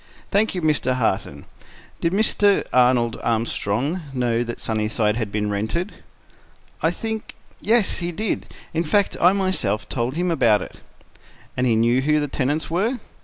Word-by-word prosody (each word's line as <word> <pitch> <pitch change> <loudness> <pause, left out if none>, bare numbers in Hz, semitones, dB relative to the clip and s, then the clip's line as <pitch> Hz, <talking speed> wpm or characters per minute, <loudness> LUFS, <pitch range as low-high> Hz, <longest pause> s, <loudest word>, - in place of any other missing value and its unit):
"Thank 210 0 +2
you. 180 - -3
Mr. 145 -5 +1
Harton, 95 - -1 0.5
did 165 - 0
Mr. 205 0 +3
Arnold 125 -2 +3
Armstrong 115 - -1
know 120 -2 +1
that 120 0 -6
Sunnyside 110 0 0
had 110 -3 -3
been 105 0 -1
rented?" 110 - -2 0.9
"I 160 - +3
think—yes, 220 +2 -1
he 175 0 -2
did. 210 +5 -2 0.3
In 165 +1 +1
fact, 200 +5 +1
I 180 - +7
myself 185 - -1
told 125 +2 -2
him 175 +1 0
about 115 - +3
it." - - -12 0.8
"And 125 0 +1
he 115 - +3
knew 120 +3 +3
who 150 +2 +2
the 145 - -1
tenants 145 +3 -1
were?" 205 +10 0
130 Hz, 150 wpm, -22 LUFS, 115-180 Hz, 0.9 s, I